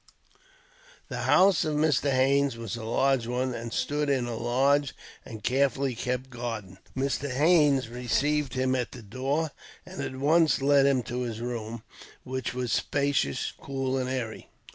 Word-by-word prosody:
The -, -, -4 dB
house 190 Hz, -3 st, +5 dB
of 155 Hz, -2 st, -1 dB
Mr. 150 Hz, -2 st, +2 dB
Haines 135 Hz, 0 st, +2 dB
was 115 Hz, -1 st, -5 dB
a 115 Hz, -, -7 dB
large 125 Hz, +1 st, +1 dB
one, 125 Hz, +1 st, -1 dB
and 115 Hz, 0 st, -6 dB
stood 145 Hz, +3 st, -1 dB
in 130 Hz, -3 st, +1 dB
a 120 Hz, -1 st, -4 dB
large 135 Hz, +4 st, +1 dB, 0.3 s
and 110 Hz, -3 st, -10 dB
carefully 135 Hz, +1 st, +1 dB
kept 125 Hz, +2 st, -3 dB
garden. 115 Hz, -6 st, -6 dB, 0.2 s
Mr. 140 Hz, +1 st, -1 dB
Haines 145 Hz, -2 st, +3 dB
received 135 Hz, +3 st, 0 dB
him 130 Hz, 0 st, +1 dB
at 125 Hz, -2 st, -2 dB
the 120 Hz, -, -10 dB
door, 135 Hz, +8 st, -2 dB, 0.3 s
and -, -, -7 dB
at 130 Hz, -, -4 dB
once 155 Hz, +3 st, +3 dB
led 140 Hz, 0 st, +4 dB
him 130 Hz, -3 st, +2 dB
to 125 Hz, +2 st, -4 dB
his 115 Hz, -3 st, -4 dB
room, 115 Hz, -2 st, -5 dB, 0.4 s
which 130 Hz, -1 st, -4 dB
was 125 Hz, -2 st, -2 dB
spacious, 140 Hz, -, 0 dB
cool, 135 Hz, -1 st, -2 dB
and 130 Hz, -1 st, -1 dB
airy. 125 Hz, -4 st, -4 dB
130 Hz, 160 wpm, -27 LUFS, 120-140 Hz, 0.4 s, house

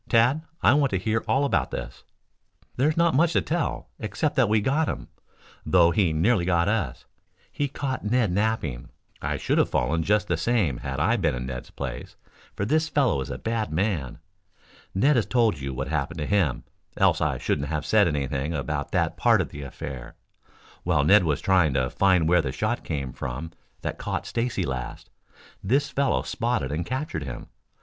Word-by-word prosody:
Tad, 125 Hz, +6 st, +4 dB, 0.2 s
I -, -, +6 dB
want 145 Hz, -2 st, +3 dB
to 95 Hz, -, 0 dB
hear 110 Hz, +4 st, -1 dB
all 140 Hz, +2 st, +2 dB
about 140 Hz, -, +1 dB
this." -, -, -7 dB, 0.7 s
"There 135 Hz, +5 st, +2 dB
is 155 Hz, -, -2 dB
not 170 Hz, -1 st, +3 dB
much 165 Hz, +4 st, +3 dB
to -, -, +3 dB
tell, 165 Hz, -1 st, -2 dB
except 110 Hz, -, -2 dB
that 125 Hz, -5 st, +3 dB
we 110 Hz, 0 st, +4 dB
got 145 Hz, +9 st, +1 dB
him, -, -, -5 dB, 0.5 s
though 85 Hz, -2 st, +4 dB
he 90 Hz, -1 st, +2 dB
nearly 90 Hz, +5 st, +2 dB
got 85 Hz, 0 st, +2 dB
us. 100 Hz, -, -1 dB, 0.5 s
He 145 Hz, -, -1 dB
caught 130 Hz, -1 st, -4 dB
Ned 110 Hz, -1 st, +1 dB
napping. 95 Hz, -, -1 dB, 0.3 s
I -, -, -2 dB
should -, -, 0 dB
have -, -, +3 dB
fallen 70 Hz, +5 st, +1 dB
just 105 Hz, +4 st, +1 dB
the 85 Hz, -, 0 dB
same 95 Hz, -, +1 dB
had 65 Hz, +1 st, -4 dB
I 110 Hz, +10 st, +2 dB
been 80 Hz, -, +1 dB
in 60 Hz, 0 st, -4 dB
Ned's 65 Hz, -1 st, -6 dB
place, 65 Hz, 0 st, -6 dB, 0.4 s
for 100 Hz, -, -2 dB
this 155 Hz, +6 st, +1 dB
fellow 135 Hz, -, +2 dB
is 65 Hz, -, -5 dB
a -, -, -4 dB
bad 115 Hz, -3 st, -2 dB
man. 80 Hz, -, -1 dB, 0.8 s
Ned 135 Hz, +8 st, +4 dB
has 115 Hz, -, +1 dB
told 115 Hz, -, +2 dB
you 70 Hz, 0 st, -4 dB
what 65 Hz, -, -4 dB
happened 80 Hz, +1 st, -2 dB
to 75 Hz, -, -2 dB
him, 85 Hz, -11 st, +1 dB, 0.3 s
else -, -, +3 dB
I -, -, +1 dB
shouldn't 70 Hz, -, -1 dB
have 75 Hz, -1 st, -3 dB
said 105 Hz, -3 st, +4 dB
anything 70 Hz, +1 st, -2 dB
about 70 Hz, 0 st, -3 dB
that -, -, 0 dB
part -, -, +4 dB
of -, -, -1 dB
the 75 Hz, -, -8 dB
affair. 65 Hz, -2 st, -7 dB, 0.7 s
While 80 Hz, -5 st, +2 dB
Ned 100 Hz, +5 st, +6 dB
was 75 Hz, -4 st, 0 dB
trying 90 Hz, -8 st, +3 dB
to 65 Hz, -2 st, 0 dB
find 90 Hz, -4 st, +3 dB
where 90 Hz, +1 st, +4 dB
the 70 Hz, -, -3 dB
shot 110 Hz, -, -2 dB
came 70 Hz, -6 st, -4 dB
from 70 Hz, +7 st, -5 dB, 0.3 s
that -, -, -4 dB
caught -, -, -3 dB
Stacy 115 Hz, -4 st, -1 dB
last, 65 Hz, -5 st, -5 dB, 0.5 s
this 130 Hz, +9 st, +1 dB
fellow 140 Hz, -2 st, +1 dB
spotted 115 Hz, -, -1 dB
and 80 Hz, +3 st, -3 dB
captured 130 Hz, -, -3 dB
him. 65 Hz, -5 st, -7 dB
95 Hz, 190 wpm, -25 LUFS, 75-120 Hz, 0.8 s, I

